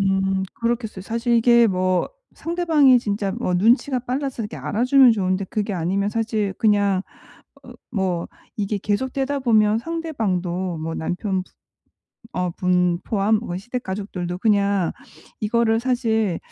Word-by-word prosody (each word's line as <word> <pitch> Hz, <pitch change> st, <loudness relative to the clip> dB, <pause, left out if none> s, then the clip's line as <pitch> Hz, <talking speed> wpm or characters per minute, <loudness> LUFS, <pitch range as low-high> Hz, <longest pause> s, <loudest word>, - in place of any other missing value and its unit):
음 195 Hz, 0 st, +1 dB
그렇겠어요. 230 Hz, -5 st, -2 dB
사실 235 Hz, +3 st, -1 dB
이게 235 Hz, 0 st, +5 dB
뭐 185 Hz, -2 st, +1 dB, 0.3 s
상대방이 320 Hz, -7 st, +3 dB
진짜 205 Hz, -3 st, -2 dB
뭐 200 Hz, -3 st, -2 dB
눈치가 245 Hz, +7 st, +3 dB
빨라서 255 Hz, 0 st, -3 dB
이렇게 210 Hz, -, -6 dB
알아주면 250 Hz, +2 st, +4 dB
좋은데 185 Hz, -2 st, 0 dB
그게 205 Hz, +1 st, -3 dB
아니면 190 Hz, +4 st, 0 dB
사실 215 Hz, -3 st, -1 dB
그냥 200 Hz, -3 st, +2 dB, 0.6 s
어 -, -, -12 dB, 0.2 s
뭐 185 Hz, -5 st, -1 dB, 0.3 s
이게 205 Hz, 0 st, -1 dB
계속되다 260 Hz, +7 st, -1 dB
보면 220 Hz, -4 st, +3 dB
상대방도 190 Hz, -, -2 dB
뭐 160 Hz, +1 st, -4 dB
남편분 185 Hz, +3 st, -2 dB, 0.9 s
어 180 Hz, -1 st, -1 dB
분 180 Hz, 0 st, +1 dB
포함 215 Hz, 0 st, +2 dB
뭐 175 Hz, -6 st, -5 dB
시댁 240 Hz, +6 st, -5 dB
가족들도 190 Hz, -3 st, -4 dB
그냥 200 Hz, -3 st, +2 dB, 0.5 s
이거를 225 Hz, +1 st, +2 dB
사실 225 Hz, -7 st, 0 dB
210 Hz, 285 characters per minute, -22 LUFS, 190-235 Hz, 0.9 s, 이게